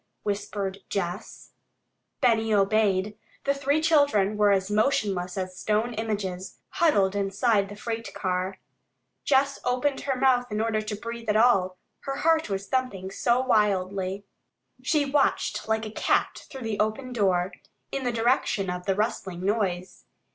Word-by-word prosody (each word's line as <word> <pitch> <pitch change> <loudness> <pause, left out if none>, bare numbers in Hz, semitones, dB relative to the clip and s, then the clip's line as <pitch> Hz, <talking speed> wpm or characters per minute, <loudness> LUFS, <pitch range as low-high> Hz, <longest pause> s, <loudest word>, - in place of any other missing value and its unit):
whispered 200 -1 -3
Jess. 190 +1 -4 0.7
Benny 225 -3 +3
obeyed. 205 0 +2 0.2
The 280 - +2
three 280 +2 +1
children 285 -11 +3
were 210 0 +4
as 195 0 +1
motionless 210 -6 0
as 185 -1 -4
stone 220 +3 0
images, 205 -4 -4
huddled 205 - +2
inside 200 +1 +1
the 205 - -8
freight 225 +1 -5
car. 185 0 -2 0.7
Jess 275 0 +2
opened 255 +3 0
her 270 -2 -1
mouth 250 -2 +3
in 210 - -1
order 220 -1 0
to 215 0 -4
breathe 230 +1 -6
at 210 - +2
all, 195 -6 +3 0.2
her 275 - -4
heart 320 -1 +2
was 195 0 -3
thumping 205 -8 -2
so 240 +5 +2
wildly. 200 -4 0 0.6
She 300 -3 +1
watched 280 -4 0
like 220 0 0
a 215 - -6
cat - - 0
through 265 -3 -8
the 220 -2 -3
open 220 +4 -1
door, 190 -4 +1 0.4
in 275 - -3
the 245 - 0
direction 225 -5 +1
of 180 +1 -6
the 195 - +2
rustling 190 -4 -2
noise. 190 -4 -2
215 Hz, 145 wpm, -26 LUFS, 195-245 Hz, 0.7 s, were